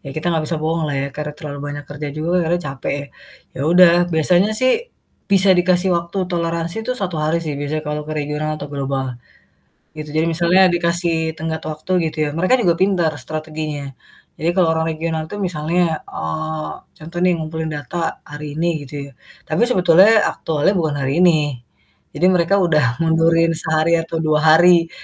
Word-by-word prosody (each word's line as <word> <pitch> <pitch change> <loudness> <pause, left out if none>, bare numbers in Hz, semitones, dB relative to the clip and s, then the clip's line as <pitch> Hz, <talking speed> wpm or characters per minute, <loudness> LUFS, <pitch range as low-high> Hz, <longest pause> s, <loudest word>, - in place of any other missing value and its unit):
ya - - -7
kita 155 - -4
gak 160 -1 0
bisa 165 - -1
bohonglah 160 -2 -1
ya 140 - -2
karena 150 0 -4
terlalu 145 -1 -7
banyak 145 0 -6
kerja 145 0 -5
juga 155 +2 -3
akhirnya 175 +1 0
capek 135 0 -4
ya. 140 - -7 0.5
Ya - - -7
udah, 180 -1 +7 0.2
biasanya 175 +5 +3
sih 255 0 +4 0.6
bisa 195 0 +6
dikasih 180 +1 +2
waktu 170 +3 -5 0.2
toleransi 170 0 -2
itu 255 - -1
1 185 -6 -3
hari 155 +2 +1
sih 155 - -3
biasanya 150 +2 -3
kalau 150 0 -3
ke - - -3
regional 150 +1 -3
atau 145 -1 -7
global 135 -1 -2 0.9
gitu. 155 -1 -7
Jadi 160 +1 +2
misalnya 175 +3 +3
dikasih 170 0 +1 0.2
tenggat 160 0 -4
waktu 155 +4 -7 0.2
gitu - - -14
ya. - - -2
Mereka 185 +8 +2
juga 175 -5 +3
pintar 180 -5 +2
strateginya. 155 -3 -5 0.5
Jadi 165 - +1
kalau 180 -3 +4
orang 160 0 -1
regional 160 0 -3
itu - - -6
misalnya, 170 -2 -1
eee, 155 - -4 0.3
contoh 165 +2 -10
nih 180 0 +3
ngumpulin 160 0 -4
data 145 +4 -6 0.3
hari 150 +1 -8
ini 170 +2 0 0.2
gitu 130 - -15
ya. 140 - -12 0.4
Tapi 155 - 0
sebetulnya 190 +2 +5
aktualnya 160 +5 0
bukan 160 -6 -1
hari 135 -1 -1
ini. 175 -3 +5 0.7
Jadi 180 - 0
mereka 175 +2 +2
udah 150 -10 +2
mundurin 165 0 +3
sehari 160 +1 +1
atau 165 0 -5
2 155 -2 +1
hari. 165 +1 +5
160 Hz, 175 wpm, -19 LUFS, 150-175 Hz, 0.9 s, udah